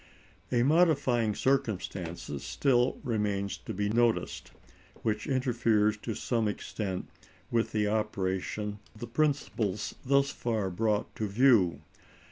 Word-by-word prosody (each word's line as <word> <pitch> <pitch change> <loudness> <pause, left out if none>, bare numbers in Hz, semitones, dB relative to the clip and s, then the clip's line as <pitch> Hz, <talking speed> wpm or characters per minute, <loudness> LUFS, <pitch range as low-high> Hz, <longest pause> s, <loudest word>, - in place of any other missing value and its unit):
A 120 -2 +3
modifying 135 - +3
circumstance 100 -10 -1
still 125 - +2
remains 105 -4 -1
to - - -7
be 105 +2 -1
noticed, 115 +2 +1 0.5
which 105 +2 -1
interferes 120 -6 +2
to 110 +1 -5
some 115 -3 0
extent 100 -2 -4 0.4
with 115 -1 +1
the 105 -1 +1
operation 105 0 -2 0.2
of 105 - -15
the - - -3
principles 120 -7 -1
thus 140 +1 +3
far 110 -5 -2
brought 105 +2 0
to 110 - -1
view. 105 -5 +4
110 Hz, 115 wpm, -30 LUFS, 105-125 Hz, 0.5 s, view